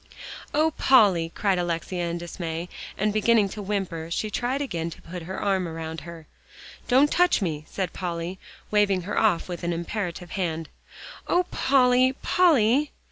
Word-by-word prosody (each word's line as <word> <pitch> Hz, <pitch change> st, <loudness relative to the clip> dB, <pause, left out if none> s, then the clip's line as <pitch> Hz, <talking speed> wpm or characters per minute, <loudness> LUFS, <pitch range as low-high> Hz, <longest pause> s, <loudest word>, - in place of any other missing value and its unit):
"Oh, 310 Hz, +2 st, +2 dB
Polly!" 195 Hz, -11 st, +5 dB
cried 195 Hz, -3 st, +1 dB
Alexia 175 Hz, 0 st, -2 dB
in 170 Hz, -, -3 dB
dismay, 170 Hz, 0 st, -5 dB, 0.3 s
and 210 Hz, +1 st, +1 dB
beginning 215 Hz, -1 st, +3 dB
to 210 Hz, -, -7 dB
whimper, 190 Hz, -5 st, -3 dB
she 210 Hz, +5 st, -2 dB
tried 250 Hz, +5 st, -1 dB
again 170 Hz, -, -3 dB
to 165 Hz, -, -11 dB
put 180 Hz, +1 st, -7 dB
her 185 Hz, +3 st, -6 dB
arm 190 Hz, -3 st, 0 dB
around 160 Hz, -1 st, -6 dB
her. 165 Hz, 0 st, -10 dB, 0.6 s
"Don't 270 Hz, +4 st, +4 dB
touch 355 Hz, 0 st, +3 dB
me," 155 Hz, -6 st, -3 dB
said 185 Hz, -3 st, -3 dB
Polly, 175 Hz, 0 st, -4 dB, 0.3 s
waving 200 Hz, -3 st, +2 dB
her 200 Hz, -, -1 dB
off 210 Hz, -7 st, +2 dB
with 175 Hz, -2 st, -6 dB
an 170 Hz, 0 st, 0 dB
imperative 175 Hz, 0 st, -4 dB
hand. 165 Hz, -4 st, -3 dB, 0.6 s
"Oh, 355 Hz, -, +3 dB
Polly! 255 Hz, -1 st, +4 dB
Polly!" 290 Hz, -5 st, +4 dB
190 Hz, 155 wpm, -25 LUFS, 170-225 Hz, 0.6 s, Polly